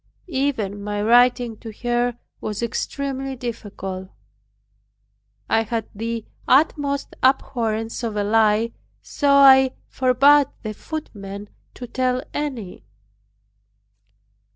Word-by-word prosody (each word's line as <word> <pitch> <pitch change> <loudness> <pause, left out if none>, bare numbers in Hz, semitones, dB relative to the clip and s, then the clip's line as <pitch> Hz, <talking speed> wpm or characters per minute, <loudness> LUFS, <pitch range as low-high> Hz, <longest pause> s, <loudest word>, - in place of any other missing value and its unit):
Even 260 - -2
my 205 0 -3
writing 240 +1 +3
to 225 - -9
her 240 0 0 0.2
was 210 +2 -4
extremely 270 +3 -3
difficult. 200 -6 -6 1.4
I 225 - +3
had 225 0 -3
the 225 +1 -4 0.2
utmost 280 0 +2
abhorrence 230 -4 0
of 225 -3 -3
a 205 - 0
lie, 220 +1 +3 0.3
so 285 - -1
I 265 -2 +7
forbade 270 +3 +4 0.2
the 215 -1 -4
footman 205 -9 -7 0.3
to 250 - -7
tell 255 +1 -1
any. 255 - -4
240 Hz, 100 wpm, -22 LUFS, 215-265 Hz, 1.4 s, I